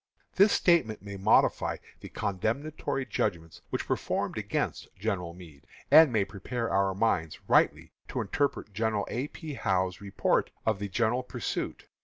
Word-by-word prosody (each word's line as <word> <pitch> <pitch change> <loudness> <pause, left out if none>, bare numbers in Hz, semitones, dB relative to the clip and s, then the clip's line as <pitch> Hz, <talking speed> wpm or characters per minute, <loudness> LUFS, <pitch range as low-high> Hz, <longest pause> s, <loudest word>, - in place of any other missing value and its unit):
This 200 +2 +5
statement 130 - +3
may 100 -1 -7
modify 100 +3 +3 0.2
the - - -10
condemnatory 135 +8 -2
judgments 80 -7 -2
which - - -3
were - - +2
formed - - -2
against - - -2
General 95 -4 -2
Meade, 80 -6 -14 0.2
and 160 -3 +9
may 105 -4 +2
prepare 115 +4 -4
our 95 0 +2
minds 85 -7 0
rightly - - +3 0.2
to - - -3
interpret 140 -7 -1
General 110 0 0
A. 130 +5 -2
P. 155 -1 -8
Howe's 95 -6 0
report 100 -1 +1 0.2
of 110 -3 +1
the 100 0 -4
general 120 +4 +1
pursuit. 125 -3 -4
105 Hz, 150 wpm, -29 LUFS, 95-125 Hz, 0.2 s, and